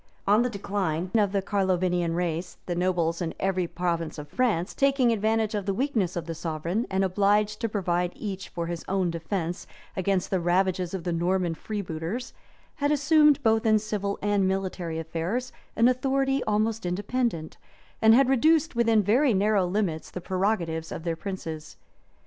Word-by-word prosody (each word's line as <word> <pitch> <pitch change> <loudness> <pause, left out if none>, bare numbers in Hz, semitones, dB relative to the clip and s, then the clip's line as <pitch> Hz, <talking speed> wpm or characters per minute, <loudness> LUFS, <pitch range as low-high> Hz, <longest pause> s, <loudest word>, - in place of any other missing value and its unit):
On 210 +3 +4
the 250 - +1
decline 190 -5 -2
of 210 -3 +3
the 195 -1 0
Carlovingian 180 -4 0
race, 175 0 -2
the 175 - -2
nobles 175 -1 0
in 165 -2 -3
every 185 -2 0
province 170 -2 -2
of 150 -1 -7
France, 210 -4 0
taking 275 -3 +3
advantage 220 0 +1
of 205 -2 -3
the 195 - 0
weakness 230 -9 0
of 170 -2 -3
the 165 - -4
sovereign, 165 +7 -2
and 190 0 +1
obliged 205 +2 +2
to 230 - 0
provide 180 -4 0
each 195 -3 -5
for 170 -1 -4
his 170 0 -5
own 190 -3 0
defence 170 +1 -3 0.3
against 190 -1 0
the 190 - +2
ravages 180 +1 +1
of 180 - -5
the 175 -1 -1
Norman 175 0 0
freebooters, 200 +5 -5 0.4
had 285 0 +1
assumed, 300 0 +4
both 220 0 +3
in 215 -2 +4
civil 205 -2 -2
and 205 -2 +2
military 185 -3 -2
affairs, 170 +10 -3 0.2
an 230 +2 +5
authority 270 +1 +1
almost 215 +1 0
independent, 195 -1 -2 0.4
and 220 0 +7
had 270 +1 +5
reduced 310 +3 +3
within 230 -2 +3
very 240 +4 +3
narrow 200 -1 +2
limits 180 -4 -1
the - - -6
prerogative 180 -4 -1
of - - -6
their 170 -1 -1
princes. 160 -4 -6
195 Hz, 165 wpm, -26 LUFS, 175-220 Hz, 0.4 s, and